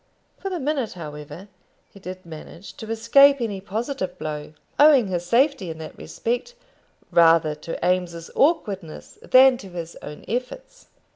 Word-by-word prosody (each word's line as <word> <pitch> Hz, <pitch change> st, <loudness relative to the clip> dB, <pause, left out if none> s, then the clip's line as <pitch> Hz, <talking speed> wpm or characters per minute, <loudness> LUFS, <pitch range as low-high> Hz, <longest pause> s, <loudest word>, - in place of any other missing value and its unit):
For 390 Hz, -, -4 dB
the 365 Hz, -2 st, -3 dB
minute, 275 Hz, -5 st, -2 dB
however, 155 Hz, +2 st, -9 dB, 0.4 s
he 200 Hz, -, -15 dB
did 185 Hz, -1 st, -9 dB
manage 165 Hz, +3 st, -11 dB
to 220 Hz, -, -8 dB
escape 275 Hz, +5 st, +5 dB
any 205 Hz, -5 st, -3 dB
positive 215 Hz, -1 st, -4 dB
blow, 150 Hz, 0 st, -6 dB, 0.3 s
owing 285 Hz, -8 st, +6 dB
his 175 Hz, -1 st, -3 dB
safety 245 Hz, -, +2 dB
in 160 Hz, -, -6 dB
that 160 Hz, -1 st, -9 dB
respect 245 Hz, -, -4 dB, 0.6 s
rather 165 Hz, -2 st, +5 dB
to 155 Hz, +2 st, -7 dB
Eames's 175 Hz, -2 st, -1 dB
awkwardness 200 Hz, -, -1 dB
than 260 Hz, 0 st, +6 dB
to 195 Hz, -, -11 dB
his 170 Hz, -2 st, -7 dB
own 150 Hz, 0 st, -10 dB
efforts. -, -, -5 dB
195 Hz, 145 wpm, -23 LUFS, 170-260 Hz, 0.6 s, owing